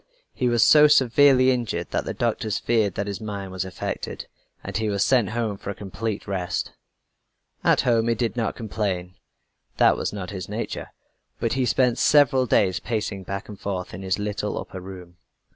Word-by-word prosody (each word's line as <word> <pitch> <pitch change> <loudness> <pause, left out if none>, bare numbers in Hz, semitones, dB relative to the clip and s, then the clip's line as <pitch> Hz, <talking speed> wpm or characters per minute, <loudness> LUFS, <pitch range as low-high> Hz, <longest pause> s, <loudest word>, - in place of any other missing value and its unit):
He 125 - 0
was 120 -1 +4
so 150 0 +7
severely 130 -1 +5
injured 115 -9 -2
that - - -1
the - - -3
doctors 110 -2 -1
feared 110 -5 +1
that 100 - -2
his 100 +2 -5
mind 100 -3 -5
was 95 -1 -3
affected, 95 -1 -5 0.4
and - - -7
he 110 -1 0
was 100 -1 +1
sent 125 -6 +3
home 110 -3 -2
for - - -7
a 100 - -4
complete 100 +2 -4
rest. 90 -3 -2 0.9
At - - +4
home 115 -2 +2
he 115 - +2
did 115 +1 -1
not 115 -2 -1
complain 95 -5 -3 0.6
that - - +5
was - - -2
not 100 -3 -6
his 95 -2 -6
nature 110 +3 -4 0.5
but 115 - 0
he 130 -1 0
spent 125 -2 +2
several 135 -3 +4
days 95 -5 +2
pacing 105 -4 -3
back 100 +2 -5
and 105 -2 -10
forth 95 -3 -4
in 90 - -7
his 95 -1 -1
little 105 0 -3
upper 95 - -6
room. 90 -2 -11
105 Hz, 185 wpm, -24 LUFS, 95-120 Hz, 0.9 s, so